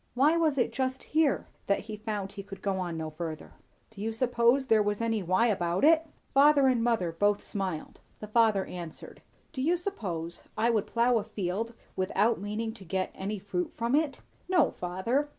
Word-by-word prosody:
why 290 +6 +4
was 315 -4 +2
it 245 - +1
just 260 0 -2
here 310 -3 +1 0.2
that 200 - +2
he 215 0 -7
found 210 -2 -4
he 200 - -7
could 195 -1 -11
go 190 -3 -1
no 160 -2 -4
further?" 155 0 -6 0.4
"Do 210 -3 -10
you 225 +2 -1
suppose 240 +2 +2
there 220 -4 +4
was 205 0 0
any 225 -2 0
'why' 185 +5 +2
about 180 -5 0
it?" 320 +1 +5 0.3
Father 285 0 +6
and 250 -3 +3
mother 225 -8 +1
both 205 +5 +1
smiled; 190 -6 -4 0.2
the - - -7
father 215 -2 +3
answered. 170 -3 -8 0.3
"Do 260 - -3
you 335 +6 +2
suppose 180 - -4 0.2
I 230 +2 +3
would 215 -3 0
plough 235 0 +3
a - - -4
field, 215 +2 -3 0.2
without 200 +4 +1
meaning 215 +2 -3
to 215 -4 -12
get 190 +1 -2
any 205 +2 -4
fruit 185 -2 -3
from 235 +1 -1
it." 295 -1 +1 0.3
"No, 355 -7 +4
father." 230 +11 -1
215 Hz, 185 wpm, -29 LUFS, 190-250 Hz, 0.4 s, Father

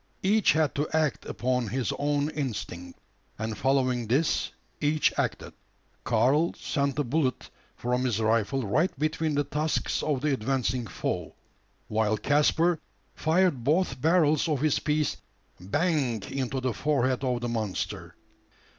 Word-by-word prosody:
Each 210 +2 +4
had 155 -4 +1
to 145 +2 -1
act 155 -4 0
upon 125 -1 -1
his 120 +2 -1
own 145 +1 0
instinct; 100 - -5 0.4
and 110 0 -3
following 130 -1 +1
this 140 +8 +1 0.3
each 150 +1 +2
acted. - - -2 0.5
Karl 130 +8 +2
sent 140 -3 -1
the 145 - 0
bullet 135 0 -1 0.2
from 125 +1 -1
his 115 -4 0
rifle 115 +4 +1
right 155 - +2
between 155 +1 0
the 145 - +2
tusks 150 +2 -1
of 145 -4 -1
the 150 -1 +1
advancing 130 -1 -1
foe; - - -4 0.5
while 110 0 +1
Caspar 150 - +2 0.3
fired 160 -5 +1
both 145 -2 +1
barrels 160 -1 +3
of 145 -4 0
his 155 -2 +2
piece 150 0 0 0.4
"bang" 130 - 0
into 135 0 -2
the 130 -2 -1
forehead 130 0 0
of 125 -2 0
the 120 - -2
monster. 110 -5 -3
135 Hz, 135 wpm, -27 LUFS, 120-150 Hz, 0.5 s, Each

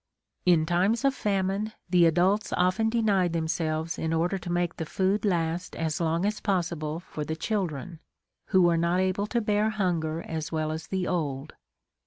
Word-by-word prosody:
In 165 -3 +5
times 190 - +1
of 275 - +4
famine, 200 -1 -1
the 175 -1 +5
adults 185 +6 +2
often 185 +5 +2
denied 205 -7 +2
themselves 160 0 -1
in 160 0 -1
order 175 +4 0
to 175 - -6
make 175 -1 -1
the 160 - -3
food 195 +3 0
last 175 -2 -1
as 160 0 -2
long 165 +2 +1
as 210 +1 -1
possible 170 -5 -1
for 155 -3 -6
the 160 +2 -3
children, 170 - -3 0.5
who 190 -2 +4
were 170 -1 +4
not 170 +2 +1
able 190 +2 0
to 235 - 0
bear 210 0 +1
hunger 170 -6 -1
as 160 -1 -4
well 155 -1 -1
as 160 0 -5
the 190 -1 -1
old. 140 -6 -2
175 Hz, 175 wpm, -27 LUFS, 160-195 Hz, 0.5 s, In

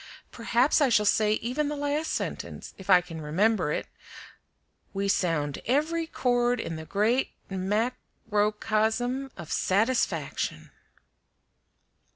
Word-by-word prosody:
Perhaps 240 +6 +2
I 280 - +4
shall 210 -3 +3
say 210 0 +3
even 250 +7 -1
the 295 - -2
last 290 +2 -1
sentence, - - -4
if 190 0 -13
I 180 -2 +7
can 165 -2 -8
remember 180 +3 +1
it: - - -2 1.1
'We 200 0 0
sound 150 -7 0
every 320 +6 +1
chord 245 -4 +1
in 165 - -4
the 160 0 -7
great 220 +9 +1 0.2
mac 210 +6 -1 0.3
ro 210 0 +2
cosm 225 +5 0
of 170 -3 -8
satisfaction." 220 +7 0
220 Hz, 125 wpm, -27 LUFS, 190-255 Hz, 1.1 s, I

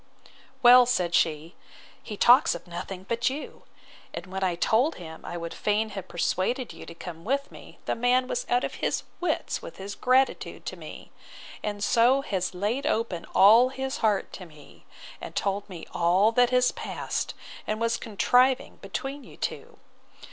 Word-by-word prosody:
Well, 245 0 +8
said 180 -8 0
she, 160 +1 +1 0.5
he 210 - -8
talks 245 - +6
of 170 - -9
nothing 180 +2 -7
but 235 +1 +1
you: 285 +3 -8 0.5
and - - -6
when 190 +1 -5
I 180 -2 +1
told 235 - +2
him 160 -2 -10
I 175 - -6
would 170 0 -6
fain 215 +1 0
have 195 -3 -7
persuaded 205 +8 -1
you - - -11
to 170 - -9
come 165 -1 -9
with 275 +5 -1
me, - - -13
the - - 0
man 250 +2 +2
was 245 - -3
out 245 +1 +2
of - - -3
his - - 0 0.2
wits 360 - -1
with - - -10
his 195 +1 -6
gratitude 260 +4 +1
to - - -4
me: - - -11 0.5
and 205 -1 -4
so 245 +5 +4
has 190 -8 -3
laid 225 +10 -1
open 215 - -1
all 225 +6 +7
his 265 +1 -4
heart 215 -7 0
to 185 - -9
me, 150 -3 -17 0.4
and - - -8
told 200 +1 -1
me 175 -4 -8
all 180 +6 +3
that 245 +1 +4
has 250 0 +3
passed, - - -4 0.3
and 215 0 -2
was 230 0 +1
contriving 250 +5 +2
between 275 +1 -6
you - - -14
two. - - -5
215 Hz, 175 wpm, -26 LUFS, 185-250 Hz, 0.5 s, Well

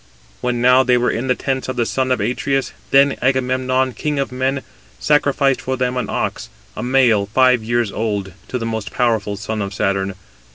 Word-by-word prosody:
When 125 -1 -1
now 125 +1 +6
they 125 -1 +3
were 120 0 +1
in 120 +3 -3
the 125 - +2
tents 130 0 -2
of 130 - -3
the 120 -1 +1
son 130 +2 -1
of 125 - +2
Atreus, 135 +5 -1 0.2
then 140 0 +4
Agamemnon, 130 0 +1
king 150 +2 -2
of 135 -2 -1
men, 130 +1 -1 0.4
sacrificed 140 -2 +2
for 130 0 -2
them 125 0 -1
an 125 - -2
ox, - - -3 0.3
a - - -5
male, 120 -5 +3
five 125 +1 +3
years 120 -2 0
old, 100 -4 -3
to 125 - -3
the 115 - -4
most 110 -4 -3
powerful 110 -4 0
son 110 +1 -4
of 100 0 -4
Saturn. 100 -1 -1
125 Hz, 195 wpm, -19 LUFS, 110-130 Hz, 0.4 s, now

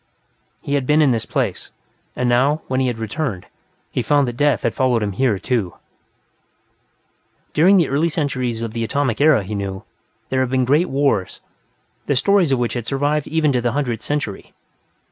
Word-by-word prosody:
He 140 - -3
had 140 -3 0
been 150 +1 +4
in 145 -4 +4
this 115 -3 -1
place, - - -2 0.5
and 125 - -1
now, 135 +6 +2
when 130 0 -1
he 130 - +1
had 120 -2 -2
returned, 115 - -4 0.5
he - - -1
found 145 -2 +2
that 120 - -4
death 145 +2 +1
had - - 0
followed 125 -4 +1
him 100 - -2
here, 110 +1 +1
too. 105 -5 -2 1.8
During 185 +6 +5
the 170 -5 +3
early 150 +5 +1
centuries 130 -7 -2
of 115 -1 -5
the 115 -1 -2
Atomic 140 0 -1
Era, 150 -8 +5
he 100 +3 -6
knew, 100 -2 -4 0.5
there 130 - 0
had 130 -1 +1
been 130 -1 +1
great 150 +8 +2
wars, 135 -9 0 0.7
the 145 - +1
stories 190 +2 +3
of 135 - +3
which 120 -2 -1
had 120 -2 -4
survived 145 +2 0
even 155 -2 +1
to 125 -2 0
the 120 -1 -1
Hundredth 125 -6 -2
Century. 145 -9 -4
130 Hz, 185 wpm, -20 LUFS, 115-145 Hz, 1.8 s, During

